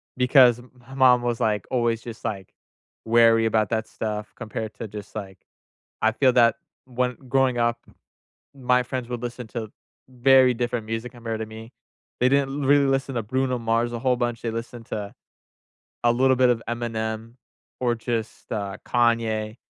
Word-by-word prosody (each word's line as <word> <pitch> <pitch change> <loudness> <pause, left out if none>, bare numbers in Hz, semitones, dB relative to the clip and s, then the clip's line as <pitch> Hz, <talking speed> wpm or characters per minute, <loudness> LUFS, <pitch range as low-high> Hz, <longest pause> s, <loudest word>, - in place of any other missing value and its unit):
because 125 -1 +5
m 125 - -16 0.2
mom 125 -2 +5
was, 120 -1 -1
like, 105 -3 0
always 120 -2 +1
just, 115 -2 -9
like, 95 -3 -4 0.5
wary 115 0 +5
about 110 -2 +1
that 110 -1 -1
stuff 105 -1 -5
compared 110 -1 -6
to 115 - -6
just, 105 0 -10
like 95 -3 -7 0.6
I 110 0 +3
feel 130 +1 +3
that 120 -2 +5 0.3
when 125 -1 -1
Growing 130 -2 +2
up, 120 0 +1 0.8
my 125 -1 +2
friends 125 0 -5
would 120 -1 -5
listen 120 0 -5
to 110 -3 -5 0.4
very 130 0 +5
different 120 -2 -2
music 115 +2 -4
compared 115 -2 -5
to 110 - -3
me. 110 +1 -11 0.5
They 125 - +5
didn't 140 +1 +1
really 145 0 +5
listen 135 0 0
to 115 - 0
Bruno 130 +3 -1
Mars 115 +1 0
a 120 - -3
whole 125 0 +2
bunch. 120 -1 -2
They 115 - -2
listened 115 0 -7
to 100 -1 -5 0.9
a 120 - +5
little 130 +1 +3
bit 125 0 +4
of 115 -2 0
Eminem 115 -1 -3 0.5
or 120 -2 +1
just, 115 -1 -4
uh, 100 -2 -3
Kanye. 115 -2 +1
120 Hz, 170 wpm, -24 LUFS, 110-125 Hz, 0.9 s, because